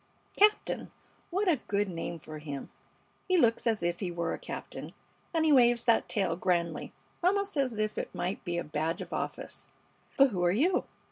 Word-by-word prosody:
"Captain. 420 +1 +3 0.4
What 390 +3 0
a 335 -5 +4
good 205 0 +1
name 170 -1 -4
for 155 -1 -9
him. 145 -3 -6 0.6
He 370 -1 +3
looks 230 -6 +3
as 225 -2 +1
if 175 0 0
he 190 - -2
were 170 -1 -2
a - - -5
captain, - - -7 0.4
and 325 -2 +2
he 310 - +4
waves 240 -3 +5
that 230 -2 +3
tail 195 -3 +1
grandly, 170 -3 0 0.3
almost 400 +1 +2
as 260 -6 0
if 215 0 -1
it - - -5
might 180 +3 -2
be 175 -2 -2
a 170 - -1
badge 155 +3 -2
of - - -7
office. - - -4 0.5
But 275 0 +7
who 180 -3 -1
are 175 - +4
you? 325 - +2
210 Hz, 190 wpm, -30 LUFS, 170-290 Hz, 0.6 s, But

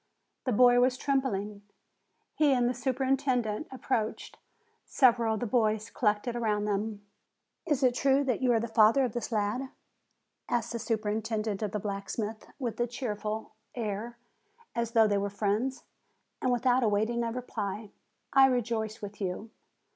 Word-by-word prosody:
The 255 - +1
boy 245 +2 +6
was 250 +1 +3
trembling. 210 -8 -1 0.7
He 295 -3 +3
and 245 -2 +2
the 245 - +1
superintendent 260 -2 0
ap 260 - -10
proached; 225 -4 -1 0.5
several 235 -4 +3
of 220 - -5
the - - 0
boys 220 -1 +1
collected 210 +1 0
around 210 -3 0
them. 205 0 -2 0.6
"Is 290 -4 +1
it 250 -1 +4
true 275 +2 +3
that 255 -3 -1
you 255 -1 +3
are 230 - +3
the 235 - -2
father 225 +4 +5
of 245 - -2
this 240 0 -4
lad?" 220 +5 -1 0.8
asked 235 -1 0
the 235 - -3
superintendent 215 -1 -2
of 210 -2 -2
the 210 - -1
blacksmith, 205 +2 -4
with 245 -5 -4
a 240 - +1
cheerful 220 -3 -4 0.2
air, 230 +1 -4 0.6
as 235 -1 -2
though 225 -2 +6
they 205 -1 +1
were 200 0 -1
friends. 210 +6 -1 0.6
And, 255 - +1
without 250 +1 +3
awaiting 220 +2 +1
a 230 - -1
reply: 215 -4 -4 0.4
"I 270 0 +7
rejoice 230 -3 -1
with 205 +1 -8
you. 195 +4 -4
230 Hz, 155 wpm, -29 LUFS, 210-250 Hz, 0.8 s, I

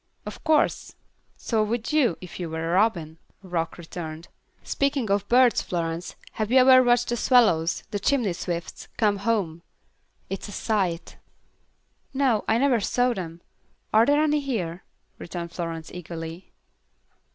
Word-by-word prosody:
"Of - - -8
course. 315 -2 +1 0.4
So 225 -2 0
would 230 +5 -2
you, 265 - +3
if 180 0 -9
you 175 -2 -4
were 160 +1 -3
a - - 0
robin," 175 -6 +1 0.2
Rock 170 -3 -3
returned. 165 -1 -8 0.3
"Speaking 275 -6 -1
of 200 0 +1
birds, 250 0 +5
Florence, 165 -1 -4 0.2
have 215 0 -3
you 260 - +5
ever 255 0 +8
watched 240 -1 +2
the 240 - 0
swallows 195 -11 +3
the 205 - -2
chimney 230 -3 +1
swifts 170 -1 -5
come 210 -2 +2
home? 200 -6 -1 0.7
It's 195 +2 -5
a - - -9
sight." 190 -7 -2 1.0
"No, 260 -6 +2
I 220 - +3
never 260 -2 +3
saw 245 +4 +1
them. 170 -4 -7 0.5
Are 220 +2 +5
there 290 +1 +4
any 300 -1 +2
here?" 195 - -3 0.4
returned 170 -1 -6
Florence, 165 -2 -5
eagerly. 165 0 -8
200 Hz, 145 wpm, -25 LUFS, 170-245 Hz, 1.0 s, ever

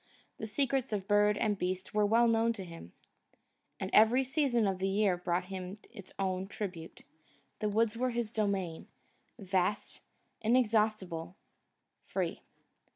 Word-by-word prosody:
The 220 - -4
secrets 265 +2 0
of 200 -2 -2
bird 205 0 +4
and 210 -2 0
beast 185 +1 -3
were 210 -1 +3
known 230 +1 +3
to 200 -4 -7
him; 165 - -10 0.9
every 230 +5 +4
season 265 -4 +1
of 190 -2 0
the 190 - 0
year 195 -1 +2
brought 175 +1 -1
him 185 +1 -6 0.2
its 195 -2 -11
own 190 -1 -1
tribute; 180 -5 -6 0.6
the 210 - 0
woods 220 +1 +1
were 255 +2 0
his 235 -2 -2
domain, 195 -6 -1 0.5
vast, 190 -1 -1 0.4
inexhaustible, 215 -7 +1 0.7
free. - - -2
205 Hz, 130 wpm, -32 LUFS, 185-225 Hz, 0.9 s, bird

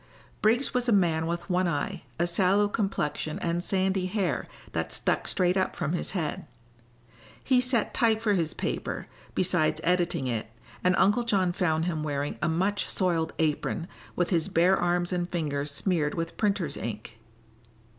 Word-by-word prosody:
Briggs 235 +6 +2
was 250 -1 +1
a - - +4
man 165 -5 +3
with 170 0 -3
one 185 -1 +1
eye, 145 -4 -2 0.2
a 170 - +2
sallow 190 +4 +3
complexion 195 -7 -2
and 170 0 -1
sandy 190 -1 +1
hair 195 -1 -1 0.2
that - - -2
stuck - - -1
straight 180 -1 +2
up 190 -1 0
from 155 - -2
his 175 - -1
head. 155 -4 -3 1.0
He 255 -2 +4
set 250 -3 +1
type 225 -2 +3
for 220 -2 +1
his 165 -5 0
paper, - - -3 0.3
besides 160 -4 +2
editing 175 -5 +1
it, 115 -3 -2 0.4
and 180 0 +4
Uncle 205 +6 +4
John 195 -6 +1
found 160 -3 +1
him 165 -3 -1
wearing 145 -1 -2
a - - +1
much 190 +5 0
soiled 170 -4 0
apron, 160 +2 0 0.3
with 175 +1 0
his 165 -3 +2
bare 180 +3 +4
arms 175 0 0
and 175 0 -1
fingers 150 -4 -2
smeared 150 0 0
with 165 0 -3
printer's 195 -8 0
ink. 110 0 -6
175 Hz, 165 wpm, -28 LUFS, 160-195 Hz, 1.0 s, a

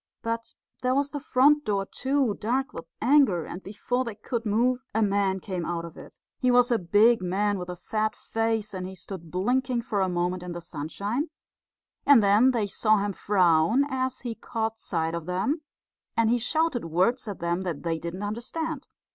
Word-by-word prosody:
But 230 0 -3 0.3
there 255 0 +1
was 285 +1 +1
the 290 - -3
front 290 +1 +4
door 200 -4 0
too, 265 0 0
dark 260 +8 -1
with 165 - -7 0.2
anger, 245 - +4
and 180 - -7
before 230 +6 -2
they 230 -4 -6
could 230 +1 -4
move 245 +4 +2 0.2
a 220 - +3
man 200 -2 +1
came 185 -2 -4
out 170 0 -3
of 165 - -10
it. - - -13 0.2
He 255 - +2
was 245 0 +5
a 235 - +3
big 210 +5 +4
man 200 +2 0
with 180 0 -6
a 180 - -4
fat 215 +4 -2
face, 225 -2 -1
and 185 -1 -4
he 190 - -8
stood 180 -3 -8
blinking 245 - 0
for 210 -4 -1
a 190 - +1
moment 180 +1 -1
in 180 -1 -6
the 175 - -5
sunshine; 200 - -3 0.7
and 275 -6 +6
then 205 +6 +5
they 235 -5 +1
saw 215 +2 +2
him 200 0 -1
frown 185 - +3
as 260 0 -2
he 240 -2 -3
caught 225 0 -3
sight 165 -5 -2
of 170 -1 -4
them; 195 - 0 0.6
and 230 0 +4
he 245 - +3
shouted 310 - +1
words 185 +10 +1
at 200 -4 -4
them 170 +2 -1
that 175 -6 -4
they 165 -1 -1
didn't 170 +4 -5
understand. 265 +8 -4
215 Hz, 195 wpm, -26 LUFS, 185-250 Hz, 0.7 s, and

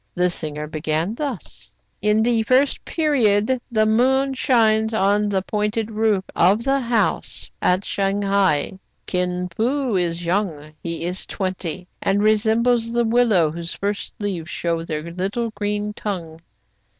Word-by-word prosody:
The 180 0 +2
singer 150 -2 -4
began 155 +4 -2
thus: 230 - -6
— - - -46
"In 210 +2 +3
the 235 -1 +2
first 260 +5 +2
period 255 -6 +2
the 215 -2 +3
moon 265 +5 +2
shines 220 -4 +2
on 205 +1 +2
the 190 -2 0
pointed 210 +2 -1
roof 215 -3 +1
of 200 +6 +4
the 275 +1 +2
house 235 -3 -1
at 185 +2 +2
Shang 200 0 0
hai. 190 -3 +1 0.3
Kin 180 0 -1
Fo 250 +1 0
is 175 -1 -1
young, 170 -5 -2
— - - -44
he 170 0 -3
is 180 +2 -3
twenty, 185 -2 -4
— - - -46
and 200 +1 +1
resembles 225 +2 +2
the 235 0 +2
willow 225 -9 +3
whose 170 +1 -5
first 205 +1 -3
leaves 185 -6 -4
show 170 -1 -1
their 155 -2 -4
little 200 +6 -2
green 210 0 -2
tongue. 170 -7 -5
205 Hz, 150 wpm, -22 LUFS, 180-225 Hz, 0.3 s, of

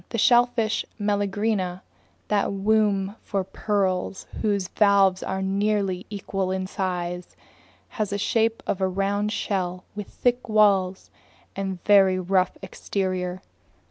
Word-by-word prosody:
The 230 - -3
shellfish 240 -1 +3 0.2
Meleagrina, 205 -2 -1 0.5
that 205 -1 +1
womb 200 0 +1
for 195 -1 -2
pearls 190 -1 -1 0.2
whose 200 -4 0
valves 200 -3 +4
are 190 0 -3
nearly 195 -1 0
equal 195 -2 -3
in 190 0 -2
size, 180 -2 -4 0.5
has 215 -3 -2
the 200 - -2
shape 225 +2 +1
of 195 - -2
a 190 - +3
round 200 +2 -1
shell 180 -4 -2
with 210 -1 -5
thick 245 -1 -1
walls 195 -3 +3 0.4
and 195 -1 -2
a 180 - -13
very 195 -2 +6
rough 185 0 +1
exterior. 185 -1 -3
195 Hz, 125 wpm, -24 LUFS, 185-210 Hz, 0.5 s, very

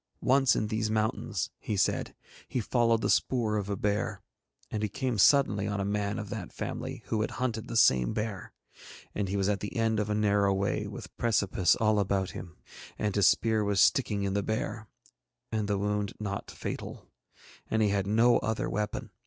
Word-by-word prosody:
Once 135 0 +4
in 110 - 0
these 110 0 -1
mountains, 110 -3 -1
he 105 - -3
said, - - 0 0.3
he 125 - -2
followed 115 0 +2
the - - 0
spoor 115 -5 +1
of 100 -1 -3
a 100 - 0
bear, 105 +1 -1 0.5
and 105 - -2
he 105 - -1
came 125 +1 -2
suddenly 105 -5 +4
on 100 0 -2
a 100 - -1
man 100 +1 -1
of 105 -2 -6
that 100 -6 -5
family - - -5
who 110 - 0
had 110 - -1
hunted 120 -3 -2
the 115 - -2
same 65 - +4
bear, 105 -3 -4 0.6
and 100 -2 -2
he 100 - -1
was 95 -1 +1
at 100 -1 +1
the 105 - -6
end 110 -1 +1
of 105 0 -1
a 105 - +1
narrow 100 -1 +3
way 95 0 -1
with - - -9
precipice 100 -6 +2
all 110 -1 +2
about 95 -1 0
him, 90 -1 -9 0.4
and 105 -2 -1
his 100 -2 +5
spear 110 -2 +2
was 100 -2 +1
sticking 100 +4 +3
in 100 -1 -1
the 100 - +1
bear, 110 +1 -3 0.6
and 110 -2 -1
the 100 -1 0
wound 105 0 -1
not 100 -2 -4
fatal, - - -6 0.6
and 110 0 +2
he 105 - +3
had 100 -1 0
no 115 +3 +4
other 110 0 -2
weapon. 105 +2 -3
105 Hz, 195 wpm, -29 LUFS, 100-110 Hz, 0.6 s, his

